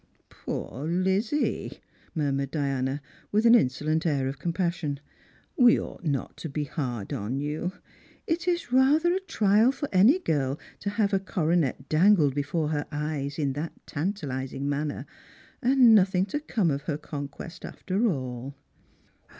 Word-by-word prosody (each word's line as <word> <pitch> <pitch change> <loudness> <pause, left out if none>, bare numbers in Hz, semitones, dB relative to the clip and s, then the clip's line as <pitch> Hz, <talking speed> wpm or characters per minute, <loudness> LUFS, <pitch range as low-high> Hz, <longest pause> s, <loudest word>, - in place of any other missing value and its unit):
" - - -41
Poor 140 +5 -5
Lizzie," 190 - 0 0.4
miirmured 140 -3 0
Diana, 135 -1 -1 0.3
with 215 +2 +2
an 230 - +8
insolent 155 - +2
air 140 -6 +1
of 135 0 -5
com 170 - -1
passion. 170 -5 -2 0.3
" - - -33
We 240 - +7
ought - - -8
not 145 -5 -2
to 160 - -6
be 150 +2 -2
hard 125 -8 -4
upon 110 +6 -3
you. 150 +5 -3 0.5
It 330 +1 -1
is 345 -8 0
rather 295 +7 +4
a 375 - +1
trial 220 - +3
for 285 +1 -4
any 210 - +6
girl 145 - -1 0.2
to 200 - -2
have 205 0 0
a 195 - +4
coronet 170 - 0
dangled 160 -3 +4
before 150 +2 -1
her 145 -1 -2
eyes 145 -2 -3
in 140 -4 0
that 150 +4 -4
tantalising 140 -6 -3
manner, 145 +1 -2 0.6
and 255 -2 +6
nothing 190 -2 +4
to 295 - +1
come 215 - 0
of 140 0 -2
her 150 - 0
conquest 150 +3 -7
after 200 +5 -1
all!" 130 - -3
160 Hz, 155 wpm, -27 LUFS, 140-205 Hz, 0.6 s, an